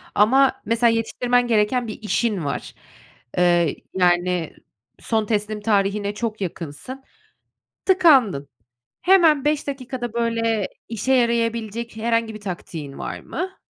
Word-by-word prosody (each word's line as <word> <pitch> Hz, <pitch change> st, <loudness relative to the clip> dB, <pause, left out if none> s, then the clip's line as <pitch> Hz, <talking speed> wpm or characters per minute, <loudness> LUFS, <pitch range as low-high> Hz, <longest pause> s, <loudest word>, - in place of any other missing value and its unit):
ama 265 Hz, +5 st, +4 dB
mesela 230 Hz, +1 st, +3 dB
yetiştirmen 245 Hz, +2 st, +1 dB
gereken 230 Hz, +2 st, +1 dB
bir 215 Hz, -, -7 dB
işin 210 Hz, -4 st, -1 dB
var. 140 Hz, -, -4 dB, 0.6 s
Eee, 175 Hz, -2 st, +3 dB, 0.2 s
yani, 180 Hz, -2 st, +1 dB, 0.5 s
son 220 Hz, -2 st, 0 dB
teslim 210 Hz, 0 st, -2 dB
tarihine 205 Hz, -1 st, +1 dB
çok 220 Hz, 0 st, -4 dB
yakınsın, 180 Hz, -, -6 dB, 0.8 s
tıkandın. 270 Hz, -, +4 dB, 0.5 s
Hemen 330 Hz, -7 st, +5 dB
5 300 Hz, 0 st, 0 dB
dakikada, 255 Hz, -4 st, -5 dB
böyle, 230 Hz, -3 st, 0 dB, 0.2 s
işe 230 Hz, +4 st, 0 dB
yarayabilecek 235 Hz, -2 st, 0 dB
herhangi 230 Hz, 0 st, 0 dB
bir 215 Hz, -, -8 dB
taktiğin 170 Hz, -7 st, -7 dB
var -, -, -5 dB
mı? 375 Hz, +1 st, -6 dB
225 Hz, 115 wpm, -22 LUFS, 200-245 Hz, 0.8 s, Hemen